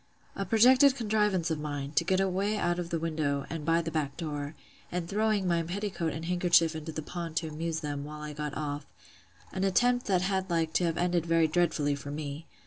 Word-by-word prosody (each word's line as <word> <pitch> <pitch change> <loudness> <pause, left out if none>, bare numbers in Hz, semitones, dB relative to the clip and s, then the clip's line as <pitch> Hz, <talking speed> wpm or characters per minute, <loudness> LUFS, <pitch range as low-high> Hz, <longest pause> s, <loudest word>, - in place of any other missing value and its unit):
A 195 - -3
projected 255 +6 +6
contrivance 210 -7 +1
of 160 - -1
mine, 145 -2 -4
to 170 - +2
get 185 +2 +1
away 195 +2 +1
out 175 -3 0
of 170 -1 -4
the 170 - 0
window, 155 -4 -1
and 165 -2 -4
by 165 +2 +2
the 165 - -4
back 145 -3 -2
door; 150 -2 -4 0.4
and 175 -1 -2
throwing 210 -1 +1
by 170 -1 +2
petticoat 180 -1 -2
and 160 +2 -5
handkerchief 170 -2 +3
into 160 +1 -5
the 155 0 -5
pond 170 0 -6
to 165 -1 0
amuse 160 +1 -3
them, 145 -1 -3
while 150 +1 -8
I 150 0 -5
got 150 -1 -4
off: 145 -1 -4 0.7
An 190 - -2
attempt 245 +6 +2
that 185 -3 +2
had 190 0 -1
like 165 -2 0
to 180 - +2
have 165 -1 -1
ended 175 -1 +1
very 165 -1 +4
dreadfully 155 -3 +1
for 140 0 -6
me! 145 +2 -5
165 Hz, 215 wpm, -29 LUFS, 150-185 Hz, 0.7 s, projected